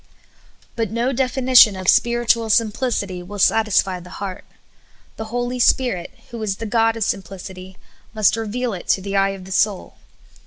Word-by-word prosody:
But 225 -3 -2
no 235 +4 -1
definition 255 -4 +4
of 185 -1 -7
spiritual 235 0 +2
simphcity 215 -4 0
will 200 +4 -9
satisfy 200 -3 +2
the 180 +1 -13
heart. 195 -2 -6 0.7
The 220 - -5
Holy 245 +2 -3
Spirit, 240 -8 +1 0.2
who 235 -1 -7
is 205 -3 -2
the 225 - -7
God 225 +1 +1
of 225 - 0
simplic 195 -1 -4
ity, 185 0 -12 0.3
must 215 -1 +2
reveal 225 +2 -3
it 180 - -8
to 190 - +2
the 200 0 -4
eye 195 0 +3
of 185 - -12
the 190 - -11
soul. 200 0 -1
215 Hz, 165 wpm, -20 LUFS, 195-235 Hz, 0.7 s, definition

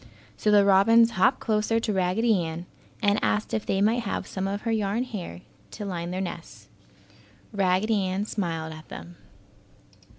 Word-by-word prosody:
So 215 - 0
the 205 -1 +6
robins 225 +4 +5
hopped 240 +7 +2
closer 220 0 +1
to 220 -2 -2
Raggedy 190 +2 +2
Ann 165 +1 -5 0.4
and 205 0 +3
asked 210 0 0
if 220 - -2
they 195 - +1
might 225 +4 +3
have 205 - -3
some 190 0 -4
of 200 +1 -3
her 230 - -2
yarn 215 +1 0
hair 190 - -7 0.3
to 205 - -7
line 175 -3 -4
their 185 +1 -3
nest. 175 -3 -7 0.8
Raggedy 200 +2 +1
Ann 190 +2 -2
smiled 165 -7 -3
at 155 0 -12
them. 85 +2 -10
200 Hz, 165 wpm, -26 LUFS, 180-215 Hz, 0.8 s, the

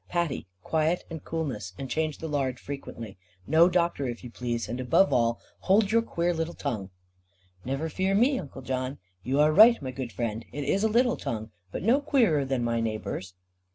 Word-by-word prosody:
Patty, 170 - -1 0.2
quiet, 160 +2 +1
and 160 -2 -6
coolness, 125 - -4
and 135 - -5
change 155 +3 -1
the 160 - -5
lard 135 -4 -1
frequently. 115 -8 -8 0.3
No 160 - +5
doctor, 170 -6 +1
if 120 0 -5
you 125 - -8
please; 120 -3 -3
and 120 +3 -4
above 130 +6 +3
all 115 -2 +2 0.2
hold 200 +1 +3
your 230 +1 +4
queer 175 -5 -1
little 165 +1 -3
tongue." 110 -9 -3 0.7
"Never 135 +5 -2
fear 190 +5 0
me, 255 +6 +3
Uncle 135 -5 -9
John; 130 +1 -3 0.2
you 130 +8 0
are 150 +1 +5
right, 225 +6 +8
my 130 - -5
good 130 -2 -5
friend, 115 -1 -3
it 145 - -4
is 190 +9 +1
a - - +5
little 245 +2 +3
tongue, 110 -1 -4 0.2
but - - -5
no 245 +7 +4
queerer 225 - +3
than 130 -2 -1
my 115 0 0
neighbours." 110 -4 -4
140 Hz, 190 wpm, -27 LUFS, 120-175 Hz, 0.7 s, right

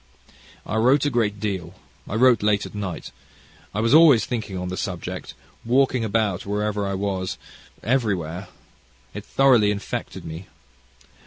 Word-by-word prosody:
"I 110 - -2
wrote 130 +6 +4
a 145 - +1
great 105 -4 0
deal; 95 -4 -4 0.3
I 105 - -3
wrote 125 -1 +5
late 105 -1 +2
at - - -10
night. 100 -4 -5 0.6
I 105 - -2
was 115 +3 +2
always 150 -8 +7
thinking 110 -6 -4
on 90 0 -4
the 90 - -4
subject, 90 -3 -5 0.3
walking 125 0 +2
about, 105 -4 0
wherever 105 0 -1
I 100 - -2
was, 95 -2 -2 0.5
everywhere. 100 -8 -1 0.7
It - - -6
thoroughly 125 -6 +4
infected 100 -1 -4
me. 80 +3 -8
105 Hz, 145 wpm, -23 LUFS, 95-115 Hz, 0.7 s, always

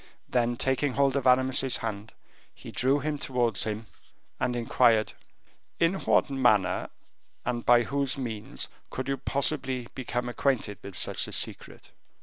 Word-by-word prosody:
Then, 120 -1 +1
taking 130 +2 0
hold 140 0 +2
of 135 -2 0
Aramis's 130 +1 +3
hand, 110 -1 -5 0.4
he - - -10
drew 135 +3 +1
him 150 0 -2
towards 120 -6 0
him, 110 +1 -3 0.5
and 125 - 0
inquired: 115 -2 +3 0.7
"In 165 +2 +3
what 195 - +2
manner 110 -9 +2 0.6
and 120 -1 -2
by 120 0 +5
whose 140 +2 -1
means 115 -5 -3 0.2
could 130 0 -5
you 135 0 -1
possibly 135 -4 -1
become 125 -1 -3
acquainted 120 -4 -1
with 100 - -8
such - - +1
a - - -8
secret?" - - -3
125 Hz, 140 wpm, -28 LUFS, 115-135 Hz, 0.7 s, by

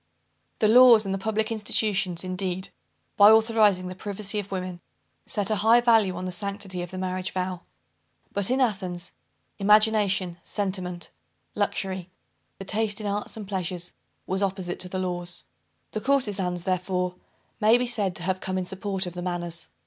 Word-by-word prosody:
The 215 - +3
laws 235 -1 +8
and 195 - -2
the 195 - -2
public 220 +2 -1
institutions, 205 -5 +1
indeed, 185 0 -3 0.5
by 205 0 +9
authorizing 220 -4 +4
the 185 - -5
privacy 205 +2 -4
of 200 -1 -7
women, 185 -2 -4 0.5
set 205 0 0
a 215 - +2
high 225 +4 +6
value 225 -6 +4
on 180 +1 -5
the 185 - -3
sanctity 200 -1 -4
of 175 - -6
the 185 - -8
marriage 185 0 -2
vow. 185 -1 -3 0.7
But 200 -1 -1
in 260 +2 +1
Athens, 185 -7 -1 0.5
imagination, 205 -4 +3
sentiment, 185 -3 -3 0.4
luxury, 190 -3 -2 0.5
the 195 - -8
taste 210 +1 0
in 215 - -6
arts 205 +2 -2
and 210 -3 -7
pleasures, 180 -2 -3 0.3
was 190 +1 -2
opposite 190 -2 -2
to 180 - -1
the 185 - -4
laws. 175 -1 -3 0.5
The 215 - -3
courtezans, 205 -10 0
therefore 180 0 -1 0.5
may 220 +3 +5
be 250 - 0
said 210 -6 -1
to 175 - -5
have 185 +1 -1
come 185 0 -2
in 185 - -2
support 190 +1 -2
of 180 - -6
the 175 - -6
manners. 175 -2 -4
190 Hz, 165 wpm, -26 LUFS, 180-210 Hz, 0.7 s, by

